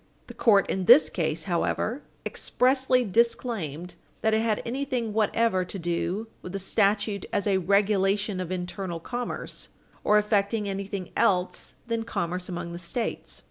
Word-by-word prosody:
The - - -10
court 205 -4 +4
in 190 -1 -1
this 155 -3 +7
case, 160 -1 -1
however, 205 - -1 0.2
expressly 255 -1 +2
disclaimed 195 - 0 0.3
that 220 - +2
it 220 - +3
had 220 -2 +1
anything 250 -3 -2
whatever 220 -2 +2
to 195 - -6
do 175 +4 -2
with 180 - -8
the - - -1
statute 200 0 +1
as 200 - 0
a 195 -2 +2
regulation 200 +1 +2
of 185 -1 -4
internal 180 -1 -4
commerce, 240 +7 -5 0.4
or 210 - +5
affecting 210 0 +1
anything 195 -1 -4
else 180 -2 +1
than 230 -1 -1
commerce 180 -5 -3
among 175 -1 -4
the 170 - -6
States. 220 +7 -4
200 Hz, 145 wpm, -27 LUFS, 180-225 Hz, 0.4 s, this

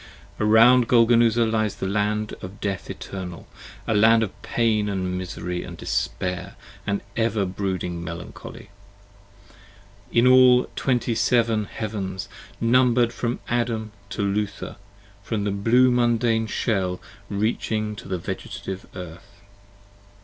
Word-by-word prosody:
30 105 - +1
Around 120 +2 +6
Golgonooza 115 -1 +5
lies 110 -2 0
the - - -4
land 105 +2 -1
of 95 +2 -9
death 100 -3 -3
eternal: 90 -3 -7 0.4
a 110 - 0
Land 110 +2 +5
Of 105 - -6
pain 110 -3 +1
and 95 -2 -2
misery 90 -1 -4
and - - -8
despair 90 -1 -3 0.3
and 100 0 0
ever 115 -3 +1
brooding 90 -2 -3
melancholy: 85 +4 -9 1.4
In 120 +1 +4
all 125 -1 +7
the - - -14
Twenty 125 -2 0
seven 115 -2 +2
Heavens, 100 -4 -5 0.3
numbered 120 0 +3
from 120 0 -3
Adam 115 -2 -1 0.2
to 100 - -3
Luther: 100 +1 -2 0.4
From 105 0 -2
the 105 - 0
blue 115 +6 +4
Mundane 120 -2 +2
Shell, 95 -5 -1 0.3
reaching 110 +1 -1
to - - -9
the 95 -1 -2
Vegetative 95 +2 -6
Earth. 95 +3 -10
110 Hz, 125 wpm, -24 LUFS, 95-115 Hz, 1.4 s, all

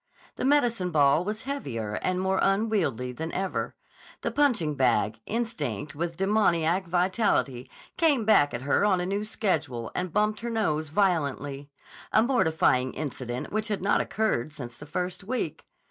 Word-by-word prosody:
The - - -3
medicine 240 -9 +2
ball 150 0 +4
was 215 +5 -4
heavier 125 - -4
and 185 0 0
more 190 0 +1
unwieldy 195 - +1
than 160 +6 -5
ever. 190 +1 -2 0.5
The - - -2
punching 240 - +2
bag, 115 -5 +1
instinct 150 - -3
with 165 +3 -3
a - - -25
demoniac 185 -3 +2
vitality, 175 - +1 0.3
came 290 -9 +3
back 145 -9 +5
at 120 - -5
her 145 +7 +2
on 200 -3 +3
a 180 - -1
new 200 +3 -1
schedule 155 - -2
and 180 -1 -2
bumped 210 +3 +1
her 235 - -4
nose 160 -10 0
violently, 145 -6 0 0.4
a 220 - +5
mortifying 160 - +2
incident 130 -4 -4
which 215 +1 -1
had 205 -4 -2
not 200 - +3
occurred 215 - -1
since 125 -5 -8
the 150 - -11
first 180 +5 -3
week. 250 +6 -3
180 Hz, 160 wpm, -27 LUFS, 140-215 Hz, 0.5 s, back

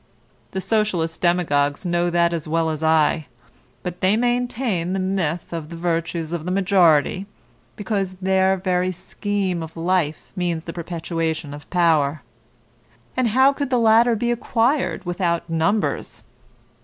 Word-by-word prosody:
The 190 - -4
Socialist 185 -7 0
demagogues 155 -4 +1
know 175 0 +1
that 170 0 +2
as 165 -3 -3
well 165 0 +1
as 155 0 -4
I, 160 -1 +2 0.6
but 180 -1 -5
they 190 +3 +3
maintain 240 -6 0
the 195 - -1
myth 180 -4 -2
of 160 -2 -5
the 170 - -7
virtues 165 -1 -2
of 170 -2 -3
the 180 - -4
majority, 185 -2 +3 0.5
because 195 -2 -2
their 190 0 +2
very 185 0 0
scheme 190 0 -3
of 160 +1 -8
life 165 -2 -1
means 175 -3 -1
the 165 - -7
perpetuation 165 -3 -3
of 145 0 -11
power. 155 -5 +2 0.9
And 255 -2 +2
how 260 +5 +4
could 280 -1 -3
the 255 - +2
latter 230 +1 +5
be 240 +2 0
acquired 240 +1 0
without 175 -1 -1
numbers? 165 +6 -1
175 Hz, 145 wpm, -22 LUFS, 165-195 Hz, 0.9 s, latter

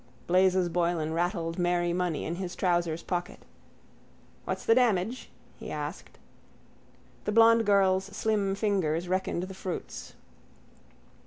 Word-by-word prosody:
Blazes 185 0 +3
Boylan 170 -2 0
rattled 170 0 -1
merry 175 -1 +1
money 180 -3 -1
in 170 +2 -3
his 185 -2 -5
trousers' 175 -3 0
pocket. 175 -1 -4 1.0
—What's - - -4
the 225 - +5
damage? 230 -1 +1 0.3
he - - -7
asked. - - -6 1.1
The - - 0
blond 230 0 +5
girl's 190 -2 +3
slim 200 -1 -1
fingers 185 -5 0
reckoned 185 -1 -1
the 190 +1 -6
fruits. 185 -1 -6
180 Hz, 115 wpm, -28 LUFS, 175-200 Hz, 1.1 s, the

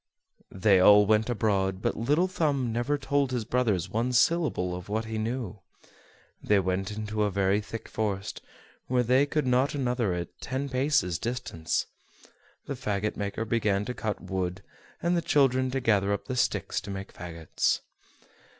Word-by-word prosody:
They 95 0 +4
all 105 +2 +7
went 110 +2 +2
abroad, 100 -5 0
but - - -1
Little 150 +10 +2
Thumb 145 -9 0
never 120 +5 0
told 140 -1 0
his 125 -3 -2
brothers 110 -9 +1
one 120 +3 -1
syllable 125 - +2
of 90 +2 -8
what 110 +2 -1
he 110 -1 -3
knew. 110 -2 -3 0.8
They 105 - +3
went 95 0 -1
into 105 0 -3
a 105 - +2
very 100 +1 +1
thick 115 +2 -7
forest, 105 -2 -3 0.5
where 125 -1 +2
they 130 +4 +3
could 150 -1 0
not 130 +2 +3
see - - -3
one 135 - -1
another 120 -7 0
at 85 0 -6
ten 135 +2 -3
paces 130 - +1
distance. 120 -9 -2 0.8
The - - -3
fagot 105 -5 -2
maker 100 +2 -3
began 105 -3 +1
to 125 - -3
cut 110 -4 -3
wood, 95 0 -3 0.4
and 170 +1 +2
the 170 - +1
children 130 -4 +3
to 135 +1 -1
gather 100 -5 +2
up 100 - -3
the 130 - -3
sticks 120 - 0
to 105 - -9
make 100 0 -6
fagots. 85 -3 -1
110 Hz, 170 wpm, -28 LUFS, 100-130 Hz, 0.8 s, all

